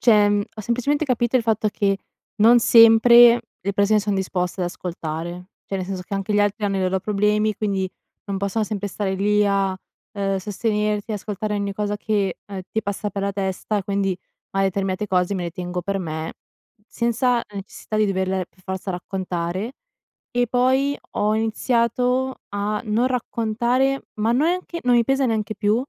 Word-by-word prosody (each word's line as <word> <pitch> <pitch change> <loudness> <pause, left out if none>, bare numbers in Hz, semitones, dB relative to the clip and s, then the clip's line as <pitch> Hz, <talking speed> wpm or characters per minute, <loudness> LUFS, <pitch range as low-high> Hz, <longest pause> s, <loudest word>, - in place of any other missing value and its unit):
cioè, 210 -3 +5
mhmm, 205 0 +2
ho - - -5
semplicemente 250 +7 0
capito 245 -2 +1
il 250 - +2
fatto 220 -1 +1
che 200 -1 0 0.4
non 230 +3 +6
sempre 235 +1 +7 0.2
le 200 +2 -2
persone 205 +2 +3
son 205 0 -1
disposte 185 -1 -2
ad 180 - +1
ascoltare. 175 0 -5 0.2
Cioè 195 - -3
nel 185 - -3
senso 190 -1 -4
che 190 - -6
anche 195 +2 -2
gli 205 - +4
altri 205 +1 0
hanno 200 -1 0
i - - -1
loro 185 +1 0
problemi, 210 +1 +1
quindi 195 -2 -1 0.4
non 200 -1 -2
possono 200 +3 -1
sempre 205 -1 -3
stare 195 0 -2
lì 210 +2 +2
a, 195 -1 +1 0.4
uhm, 195 -1 0
sostenerti, 210 +1 -1
ascoltare 210 0 -3
ogni 200 -1 -2
cosa 205 +1 -2
che, 205 -3 -1
uhm, 195 -1 -6
ti 220 - -1
passa 200 +1 -3
per 200 +1 -4
la 200 0 -1
testa, 195 +2 -2
e - - -3
quindi 195 -1 0 0.4
mari 195 0 +2
determinate 195 +1 -1
cose 185 0 +1
me 180 -2 -2
le 170 - -3
tengo 180 +1 -4
per 195 +2 -2
me, 160 -2 -4 0.5
senza 235 +1 +1
necessità 200 +2 -6
di 215 0 +3
doverle 190 -1 -1
per 185 - -27
forza 190 +1 -4
raccontare. 180 +3 -3 0.6
E 245 -1 +2
poi 260 +4 +2 0.2
ho 210 +1 +1
iniziato 245 +3 0
a 205 +1 -2
non 225 +4 +2
raccontare 245 +2 0
ma 215 +2 +1
neanche 340 +5 0
non 250 -1 +3
mi 235 - +4
pesa 270 +2 +1
neanche 215 -3 -1
più. 210 +1 +2
205 Hz, 180 wpm, -22 LUFS, 195-230 Hz, 0.6 s, sempre